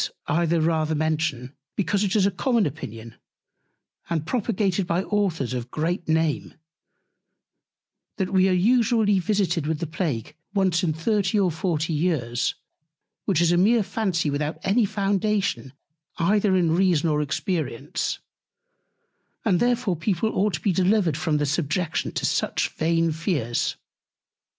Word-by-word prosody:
This - - -2
I 170 +3 +1
the 165 0 +2
rather 160 -1 +1
mention, 155 -4 -1 0.2
because 200 0 0
it 195 -1 0
is 200 -3 +4
a 200 - +2
common 235 +3 +1
Opinion, 115 -5 -7 0.9
and 160 -3 -1
propagated 200 -4 0
by 175 +2 0
Authors 190 - -1
of 125 -1 -4
great 170 +5 -2
Name, 160 -2 0 1.6
that 190 -1 -2
we 190 0 +4
are - - +2
usually 215 +1 +3
visited 185 -4 0
with 160 0 0
the 170 - -3
Plague 150 - -3 0.2
once 185 -3 +2
in 165 - +2
30 195 +5 0
or 185 -3 +2
40 160 0 -1
Years; 145 -7 0 0.7
which 185 -5 +2
is 170 0 +3
a 175 - +3
mere 215 +5 +4
Fancy 190 -6 -1
without 150 +2 -2
any 215 +4 +3
Foundation 200 -6 -1 0.5
either 200 +3 +2
in 170 -3 +2
Reason 175 -4 +2
or 150 -1 +1
Experience: 150 -3 -2 1.3
and 180 - +3
therefore 240 -5 +1
People 190 +5 -1
ought 200 -2 +1
to - - -7
be 200 - +1
delivered 185 -3 +2
from 155 0 0
the 145 - 0
Subjection 160 +3 -1
to - - -2
such - - 0
vain 165 +1 +1
Fears. 155 - -1
175 Hz, 145 wpm, -24 LUFS, 155-195 Hz, 1.6 s, is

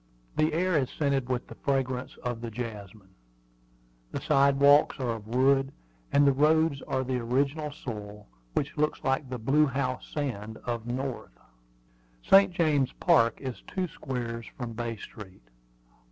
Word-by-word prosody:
The 155 +1 +2
air 180 +2 +1
is 130 - -1
scented 140 -4 -1
with 125 -1 -1
the - - -11
fragrance 130 -2 -2
of 120 -2 -3
the 120 - -4
jasmine. 105 -4 -8 1.0
The - - -3
sidewalks 140 +1 +4
are 125 -3 -1
of 110 -2 -6
wood, 135 +3 +3 0.4
and 145 0 +5
the 140 - +6
roads 155 0 +3
are 130 0 0
the 130 -1 -1
original 140 +5 0
soil, 105 -7 -8 0.3
which 140 - -1
looks 150 +1 0
like 135 -1 0
the 125 - -3
blue 140 +6 +3
house 130 -2 -2
sand 110 -7 -4
of 120 -1 -3
the 120 - -2
North. 130 0 -5 0.9
St. 195 0 +6
James 155 -6 +2
Park 115 0 +3
is 130 -3 -5
two 185 -1 -2
squares 120 -6 -5
from 120 -3 -5
Bay 115 0 -3
Street. 100 - -12
130 Hz, 155 wpm, -28 LUFS, 115-145 Hz, 1.0 s, the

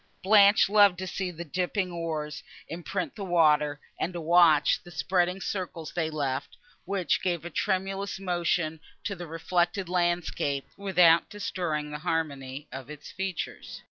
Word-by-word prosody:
Blanche 200 +1 +6
loved 200 -3 +5
to 190 - -4
see 185 0 -3
the 170 0 -7
dipping 180 +3 -1
oars 155 -3 -4 0.3
imprint 175 +3 -4
the 205 - -6
water, 150 -5 +3 0.2
and 180 - -2
to 175 - -4
watch 165 -2 +4
the 175 - -14
spreading 180 +3 0
circles 180 -5 -5
they 165 -3 -1
left, 140 -3 -3 0.3
which 190 -1 0
gave 175 -3 -1
a 175 - -6
tremulous 195 +2 -1
motion 175 -3 -1 0.2
to 200 - -3
the 175 -1 -8
reflected 175 +3 -1
landscape, 175 -5 0
without 180 -4 +4
destroying 175 -7 -3
the 150 - -5
harmony 145 -3 -3
of 130 0 -8
its 150 -1 -10
features. 190 -2 -5
175 Hz, 145 wpm, -28 LUFS, 155-185 Hz, 0.3 s, Blanche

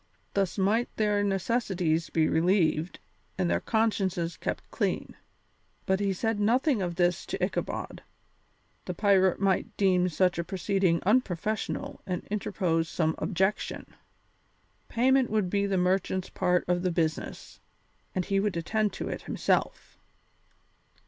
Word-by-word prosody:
Thus 195 -1 0
might 210 +5 +2
their 210 -1 +1
necessities 190 -5 0
be 160 -1 +2
relieved 165 -1 +2 0.4
and 185 -2 +1
their - - +2
consciences 195 -7 0
kept - - -4
clean. - - -2 0.7
But 190 -1 +1
he 200 -1 +1
said 220 +3 -1
nothing 240 +3 +2
of 175 -2 -2
this 175 0 +1
to - - 0
Ichabod; - - -4 0.8
the - - -4
pirate 190 -3 +3
might 195 +2 0
deem 185 -2 +3
such 180 +1 +1
a - - 0
proceeding 190 -1 0
unprofessional 215 -1 -1
and 180 -2 -3
interpose 170 -6 0
some 160 -2 0
objection. 190 +2 -1 1.0
Payment 260 +1 +3
would 210 -4 0
be 200 0 +1
the 195 -1 0
merchant's 185 +1 0
part 180 -1 +1
of 175 0 +1
the 185 - +1
business, 160 -2 -3 0.6
and 185 -2 0
he 195 -1 +1
would 200 -3 0
attend 210 +5 0
to - - -5
it - - -4
himself. - - -1
190 Hz, 135 wpm, -28 LUFS, 175-210 Hz, 1.0 s, pirate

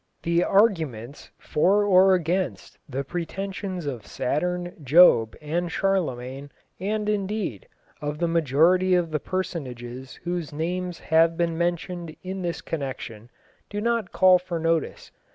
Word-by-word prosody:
The 170 +1 +2
arguments 160 - +1
for 195 +7 +2
or 190 -1 +6
against 180 +2 -2
the 135 +1 -3
pretensions 185 +2 -4
of 125 -7 -5
Saturn, 175 +5 -2
Job, 135 -6 +6
and 165 +3 -2
Charlemagne, 140 -9 -1 0.3
and, 210 +3 -2
indeed, 205 - -2 0.3
of 150 0 -3
the 170 - 0
majority 165 +4 +3
of 170 -2 0
the 155 - 0
personages 130 -9 -5
whose 175 -2 -3
names 175 +3 -3
have 165 +1 +3
been 170 -1 0
mentioned 175 -1 -2
in 190 +1 -5
this 175 -2 -3
connection, 125 -7 -6 0.4
do 205 - -4
not 230 -3 0
call 185 -1 +5
for 175 -1 -4
notice. 165 -1 -1
170 Hz, 130 wpm, -25 LUFS, 150-185 Hz, 0.4 s, or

